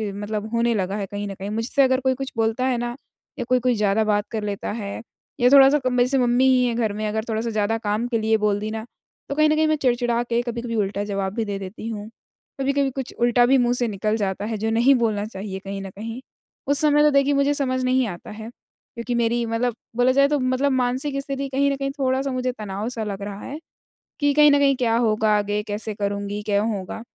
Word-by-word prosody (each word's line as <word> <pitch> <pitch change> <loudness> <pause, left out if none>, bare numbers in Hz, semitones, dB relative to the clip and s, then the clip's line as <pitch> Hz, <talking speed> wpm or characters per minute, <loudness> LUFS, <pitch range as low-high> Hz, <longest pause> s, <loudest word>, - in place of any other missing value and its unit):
मतलब 210 +1 -4
होने 235 0 +2
लगा 195 -1 -1
है 200 - -2
कहीं 205 +1 -5
न 200 - -5
कहीं। 195 +1 -6
मुझसे 225 +6 0
अगर 260 -1 +3
कोई 260 0 +2
कुछ 270 +1 -5
बोलता 225 +3 +1
है 255 -2 +1
ना 240 0 -3 0.4
या 245 - -2
कोई-कोई 250 -1 +2
ज़्यादा 210 0 +2
बात 210 -1 +1
कर 220 -2 -3
लेता 205 -1 -3
है 200 0 -5 0.4
या 245 - +5
थोड़ा-सा 275 +1 +8
अब 250 -1 +1
जैसे 255 +3 +2
मम्मी 245 0 +3
ही 255 -1 +4
है 240 - 0
घर 225 -3 0
में 215 +1 -3
अगर 220 +1 -2
थोड़ा-सा 225 +1 -1
ज़्यादा 215 +1 0
काम 215 +2 -1
के 235 - +1
लिए 220 0 +2
बोल 210 -1 +1
दी 215 +1 -4
ना, 220 0 -5 0.4
तो 280 - -2
कहीं 305 +1 +4
न 305 - +3
कहीं 315 0 +2
मैं 310 - +2
चिड़-चिड़ा 240 -3 +1
के 235 0 0
कभी-कभी 235 -1 -4
उल्टा 200 -1 -1
जवाब 195 -2 -2
भी 225 - -1
दे 200 -1 -3
देती 195 +3 -7
हूँ, 210 -1 -6 0.5
कभी-कभी 275 0 +1
कुछ 265 -1 -6
उल्टा 240 0 +4
भी 265 +2 +4
मुँह 245 -1 +2
से 245 -1 0
निकल 215 +1 -1
जाता 200 -1 -2
है 220 0 -3
जो 220 +2 -1
नहीं 240 +5 +4
बोलना 220 -4 0
चाहिए 195 -2 -6
कहीं 195 0 -6
न 195 - -6
कहीं। 225 +6 -7 0.5
उस 285 0 +2
समय 295 -1 +4
तो 300 - +6
देखिए 280 0 +3
मुझे 280 +1 +2
समझ 255 -3 -1
नहीं 255 -1 +2
आता 175 -4 -8
है 220 +1 -8
क्योंकि 240 0 -9
मेरी 235 0 +1
मतलब 230 +1 -1 0.2
बोला 245 +2 +4
जाए 275 +1 +4
तो 295 0 0
मतलब 255 +2 +1
मानसिक 260 +2 0
स्थिति 275 0 -4
कहीं 275 +1 +2
न - - 0
कहीं 275 0 -2
थोड़ा-सा 265 +1 0
मुझे 255 0 -1
तनाव 215 -2 -5
सा 230 -3 -4
लग 200 -2 -5
रहा 200 0 -6
है 290 +3 -7 0.6
कि 290 -1 +3
कहीं 295 0 +6
न 285 - +4
कहीं 275 -1 +4
क्या 235 -3 +1
होगा 220 -2 +2
आगे? 205 0 -1
कैसे 210 +1 -4
करूँगी? 200 0 -3
क्यों 205 +1 +1
होगा? 190 +3 -6
235 Hz, 240 wpm, -23 LUFS, 210-260 Hz, 0.6 s, थोड़ा-सा